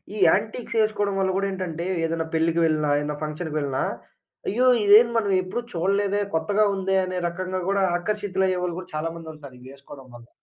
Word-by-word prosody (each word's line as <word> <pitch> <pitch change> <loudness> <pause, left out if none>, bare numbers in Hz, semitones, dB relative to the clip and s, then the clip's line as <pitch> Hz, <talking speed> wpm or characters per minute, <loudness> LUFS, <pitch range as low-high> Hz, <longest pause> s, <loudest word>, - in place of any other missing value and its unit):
ఈ - - -5
యాంటిక్సేసుకోడం 215 -1 0
వల్ల 190 -1 +1
గూడా 200 - 0
ఏంటంటే, 180 -2 -4 0.2
ఏదన్నా 165 0 -2
పెళ్ళికి 165 +1 +2
వెళ్ళినా, 155 -2 +1
ఏన్నా 150 0 -3
ఫంక్షన్‌కి 155 +1 -4
వెళ్ళినా, 140 -2 -1 0.6
అయ్యో! 245 +6 +2 0.2
ఇదేంది 220 +4 +7
మనమెప్పుడూ 195 +1 0
చూడలేదే, 200 +3 +1
కొత్తగా 200 +7 +2
ఉందే, 190 0 0
అనే 185 0 -4
రకంగా 185 +2 -4
గూడా 200 -1 +2 0.2
ఆకర్షితులయ్యేవాళ్ళు 185 -3 -1
గూడా 185 0 -10
చాలామంది 165 +1 -4
ఉంటారు, 140 -4 -12
ఇయ్యేసుకోడం 135 +1 -13
వల్ల. 120 0 -14
185 Hz, 150 wpm, -24 LUFS, 160-200 Hz, 0.6 s, ఇదేంది